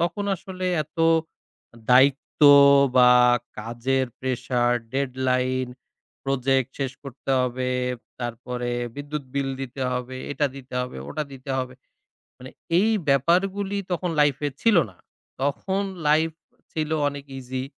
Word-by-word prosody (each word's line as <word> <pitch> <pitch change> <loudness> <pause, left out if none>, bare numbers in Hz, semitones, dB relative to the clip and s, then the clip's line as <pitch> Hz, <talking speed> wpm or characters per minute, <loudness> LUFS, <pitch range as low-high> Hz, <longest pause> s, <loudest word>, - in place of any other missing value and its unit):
তখন 175 +4 -1
আসলে 185 +1 -6 0.2
এত 155 +3 -19 0.9
দায়িত্ব 135 +4 +3 0.5
বা 125 -1 +7 0.5
কাজের 120 +4 -1
প্রেশার, 125 -1 0 0.2
ডেডলাইন 130 -1 0 0.6
প্রজেক্ট 135 -1 +1
শেষ 135 -1 -2
করতে 135 -1 -7
হবে। 125 0 -1 0.5
তারপরে 120 +1 -4 0.3
বিদ্যুৎ 145 0 -5
বিল 140 -1 0
দিতে 135 0 -5
হবে, 125 +1 -4 0.2
এটা 145 +1 +1
দিতে 130 -1 -10
হবে 125 - -5
ওটা 155 0 -3
দিতে 135 +1 -8
হবে। 130 -1 -4 0.6
মানে 130 +1 -10 0.3
এই 215 - +3 0.2
ব্যাপারগুলি 190 +8 +2
তখন 175 0 -1
লাইফ 145 -2 +4
এ - - -1
ছিল 225 -4 +4
না। 90 - -25 0.4
তখন 190 +8 -1 0.3
লাইফ 160 +2 +3 0.4
ছিল 155 -1 -2 0.2
অনেক 140 -1 -5
ইজি। 130 0 -4
135 Hz, 120 wpm, -24 LUFS, 125-150 Hz, 0.9 s, বা